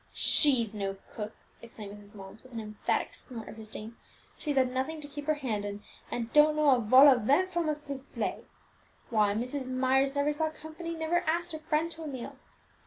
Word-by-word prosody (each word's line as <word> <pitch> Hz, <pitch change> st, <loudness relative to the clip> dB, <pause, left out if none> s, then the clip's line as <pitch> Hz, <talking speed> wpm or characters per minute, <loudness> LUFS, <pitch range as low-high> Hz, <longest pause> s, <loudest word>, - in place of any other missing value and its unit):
"She's 245 Hz, -8 st, +5 dB
no 195 Hz, -2 st, -3 dB
cook!" 215 Hz, 0 st, -7 dB, 0.3 s
exclaimed 215 Hz, -3 st, -9 dB
Mrs. 205 Hz, 0 st, -11 dB
Mullins, 195 Hz, +1 st, -11 dB
with 255 Hz, -1 st, -17 dB
an 230 Hz, -, -4 dB
emphatic 215 Hz, -1 st, -2 dB
snort 230 Hz, -4 st, -7 dB
of -, -, -9 dB
disdain: 220 Hz, +1 st, -8 dB, 0.4 s
"she's 295 Hz, -2 st, -3 dB
had 260 Hz, -2 st, +3 dB
nothing 265 Hz, +5 st, -2 dB
to 295 Hz, -, -7 dB
keep 290 Hz, 0 st, -8 dB
her 310 Hz, -, +3 dB
hand 235 Hz, -8 st, -3 dB
in, 205 Hz, 0 st, -6 dB, 0.3 s
and 235 Hz, -1 st, -4 dB
don't 300 Hz, 0 st, +6 dB
know 305 Hz, -2 st, +4 dB
a 255 Hz, -, +4 dB
vol 255 Hz, +5 st, +7 dB
au 260 Hz, -3 st, +6 dB
vent 290 Hz, -, +2 dB
from 345 Hz, -3 st, 0 dB
a -, -, +2 dB
soufflet! 280 Hz, -2 st, -4 dB, 0.7 s
Why, 210 Hz, -3 st, +3 dB
Mrs. 255 Hz, +4 st, -3 dB
Myers 265 Hz, +2 st, +2 dB
never 285 Hz, +1 st, +1 dB
saw 315 Hz, +1 st, 0 dB
company, 315 Hz, +2 st, -7 dB
never 325 Hz, +2 st, +1 dB
asked 340 Hz, +1 st, 0 dB
a 315 Hz, -, -5 dB
friend 315 Hz, +1 st, -1 dB
to 325 Hz, -, -7 dB
a 315 Hz, -, -5 dB
meal! 260 Hz, -4 st, -7 dB
265 Hz, 200 wpm, -30 LUFS, 225-305 Hz, 0.7 s, vol